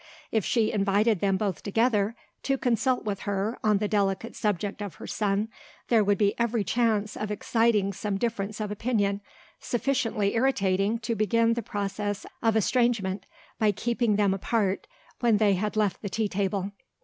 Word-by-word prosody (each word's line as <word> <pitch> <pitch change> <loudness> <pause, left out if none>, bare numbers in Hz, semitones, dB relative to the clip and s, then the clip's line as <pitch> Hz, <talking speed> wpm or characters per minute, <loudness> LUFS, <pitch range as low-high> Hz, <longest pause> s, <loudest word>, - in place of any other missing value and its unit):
If 220 -3 +1
she 225 +1 +1
invited 205 +1 +2
them 195 0 +2
both 195 -5 -2
together, 220 0 +1 0.3
to 275 0 0
consult 250 -1 +1
with 200 -2 -2
her 205 +3 -2
on 210 -2 +4
the 210 +1 -1
delicate 200 +1 0
subject 205 -1 -2
of 200 -7 -5
her - - -9
son, 205 0 0 0.4
there 225 -3 +5
would 200 0 +2
be 200 0 +3
every 235 -2 +1
chance 220 -1 +1
of 215 - -4
exciting 210 -1 +1
some 200 +1 -2
difference 215 -1 -2
of 210 -1 -3
opinion, 205 -2 0 0.4
sufficiently 230 -5 0
irritating 205 -4 +2
to 230 +1 -1
begin 230 +2 +2
the 235 - -2
process 205 0 -3 0.2
of 225 -1 +2
estrangement, 220 -3 +1 0.3
by 215 -1 +4
keeping 230 +1 0
them 200 -2 +3
apart 195 0 -1 0.3
when 235 -3 +3
they 205 -1 +4
had 210 +3 -2
left 210 -4 +1
the 200 - -4
tea 215 +3 0
table. 195 0 -1
210 Hz, 165 wpm, -27 LUFS, 200-230 Hz, 0.4 s, there